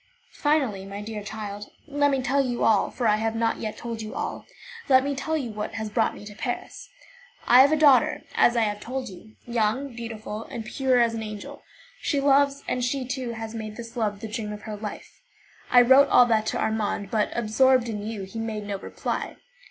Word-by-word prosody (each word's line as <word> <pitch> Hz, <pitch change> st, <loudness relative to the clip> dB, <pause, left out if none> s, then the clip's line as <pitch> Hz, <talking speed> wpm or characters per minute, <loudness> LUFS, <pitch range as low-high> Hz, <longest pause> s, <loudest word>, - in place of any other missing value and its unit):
"Finally, 275 Hz, -10 st, +1 dB
my 195 Hz, +1 st, -7 dB
dear 210 Hz, 0 st, -6 dB
child, 205 Hz, -1 st, -7 dB, 0.2 s
let 285 Hz, -1 st, +1 dB
me 270 Hz, -2 st, 0 dB
tell 275 Hz, +2 st, +2 dB
you 245 Hz, -2 st, -2 dB
all, 215 Hz, -3 st, +3 dB
for 245 Hz, -, -4 dB
I 210 Hz, 0 st, +4 dB
have 225 Hz, +1 st, -1 dB
not 225 Hz, 0 st, +1 dB
yet 215 Hz, -1 st, -4 dB
told 230 Hz, -2 st, -5 dB
you 215 Hz, 0 st, -7 dB
all, -, -, -4 dB, 0.4 s
let 260 Hz, -1 st, +6 dB
me 280 Hz, +1 st, -1 dB
tell 315 Hz, +3 st, -2 dB
you 250 Hz, -6 st, -4 dB
what 210 Hz, +1 st, -5 dB
has 220 Hz, -1 st, -4 dB
brought -, -, +1 dB
me -, -, -11 dB
to 210 Hz, -, -9 dB
Paris. 240 Hz, +3 st, -5 dB, 0.6 s
I 245 Hz, +2 st, +8 dB
have 280 Hz, +2 st, +5 dB
a -, -, +4 dB
daughter, 290 Hz, -4 st, +4 dB
as 240 Hz, -, +4 dB
I -, -, +4 dB
have 210 Hz, -2 st, 0 dB
told 255 Hz, +2 st, -5 dB
you, 210 Hz, +4 st, -14 dB
young, 240 Hz, +3 st, -1 dB
beautiful, 225 Hz, -2 st, -6 dB, 0.2 s
pure 260 Hz, +2 st, +1 dB
as 235 Hz, -1 st, +3 dB
an 225 Hz, -, -4 dB
angel. 210 Hz, -1 st, -7 dB, 0.4 s
She 285 Hz, -, 0 dB
loves, 280 Hz, 0 st, +3 dB
and 250 Hz, -, -1 dB
she, 255 Hz, +1 st, -1 dB
too, 255 Hz, -2 st, -3 dB
has 225 Hz, 0 st, -6 dB
made 215 Hz, -2 st, -6 dB
this 230 Hz, +1 st, -9 dB
love 210 Hz, -4 st, -1 dB
the 225 Hz, -, -5 dB
dream 215 Hz, -1 st, -4 dB
of 210 Hz, 0 st, -8 dB
her 215 Hz, -1 st, -5 dB
life. 210 Hz, 0 st, -8 dB, 0.5 s
I 245 Hz, -, +7 dB
wrote 265 Hz, +3 st, +7 dB
all 245 Hz, -, +7 dB
that 220 Hz, -2 st, +1 dB
to -, -, -1 dB
Armand, 210 Hz, -2 st, -1 dB
but, 215 Hz, -2 st, +1 dB
absorbed 240 Hz, +2 st, +3 dB
in 210 Hz, -3 st, -4 dB
you, 215 Hz, -2 st, -5 dB
he 195 Hz, +4 st, -7 dB
made 220 Hz, -2 st, -3 dB
no 200 Hz, -1 st, -4 dB
reply. -, -, -4 dB
225 Hz, 215 wpm, -25 LUFS, 215-260 Hz, 0.6 s, I